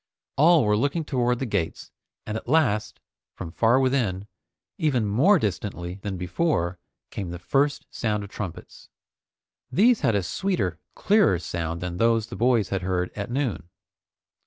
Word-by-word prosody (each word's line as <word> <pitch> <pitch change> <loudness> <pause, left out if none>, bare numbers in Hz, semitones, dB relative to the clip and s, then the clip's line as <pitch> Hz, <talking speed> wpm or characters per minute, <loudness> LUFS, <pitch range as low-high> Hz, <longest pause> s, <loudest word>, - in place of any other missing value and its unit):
All 155 -1 +5
were 105 0 +3
looking 145 +8 0
toward 125 -3 +1
the 135 - -3
gates, 100 -8 -3 0.3
and 105 - -4
at 110 - -6
last, 125 -8 +1 0.4
from 80 - -7
far 115 +8 +3
within, 120 -8 0 0.5
even 135 -8 +1
more 135 - +4
distantly 95 - -3
than 100 -2 -4
before, 90 - -1 0.3
came 95 -4 -5
the 90 - -5
first 140 +11 0
sound 105 -3 -2
of 100 - -10
trumpets. 95 -6 -8 0.8
These 230 +5 +4
had 115 - +2
a 100 - +1
sweeter, 95 - -2 0.2
clearer 205 - +3
sound 85 -1 -4
than 90 -1 -4
those 115 0 +2
the - - -9
boys 120 -4 +2
had 95 -1 -1
heard 90 -1 -1
at 105 +3 -4
noon. 120 - -2
110 Hz, 155 wpm, -25 LUFS, 90-135 Hz, 0.8 s, All